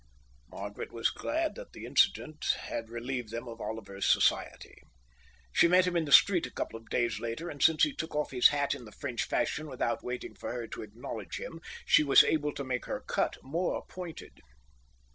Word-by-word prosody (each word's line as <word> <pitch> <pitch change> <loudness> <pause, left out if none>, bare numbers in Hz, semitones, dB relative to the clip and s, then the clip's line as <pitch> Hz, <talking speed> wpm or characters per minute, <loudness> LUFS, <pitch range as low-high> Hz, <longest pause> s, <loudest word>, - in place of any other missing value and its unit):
Margaret 100 +6 -7
was 115 0 0
glad 320 +1 -1
that - - -11
the - - -8
incident 155 0 +2 0.2
had 115 -1 -5
relieved 120 0 -4
them 115 +2 -5
of 115 -1 -8
Oliver's 105 -2 -1
society. - - +1 0.7
She - - +6
met 180 +1 +5
him 180 -1 -1
in 165 -2 +2
the 145 - -6
street 180 +3 +7
a - - -13
couple - - -4
of 115 - -21
days 120 -2 0
later, 120 +9 -4
and 145 - -9
since 160 -1 +5
he 300 - +3
took 160 - -5
off 150 0 -1
his 125 -2 +7
hat 145 -1 0
in 120 - -8
the 110 - -12
French 125 0 -3
fashion 150 +5 -1
without 125 -4 -2
waiting 125 0 -5
for - - -6
her 120 -1 -4
to - - -6
acknowledge 110 +3 -7
him, - - -7 0.2
she - - +6
was 140 -2 +7
able 150 -2 +1
to 140 - -4
make 125 -1 -3
her - - -4
cut - - 0
more 165 +7 -2
pointed. 180 -3 -9
135 Hz, 200 wpm, -30 LUFS, 115-160 Hz, 0.7 s, street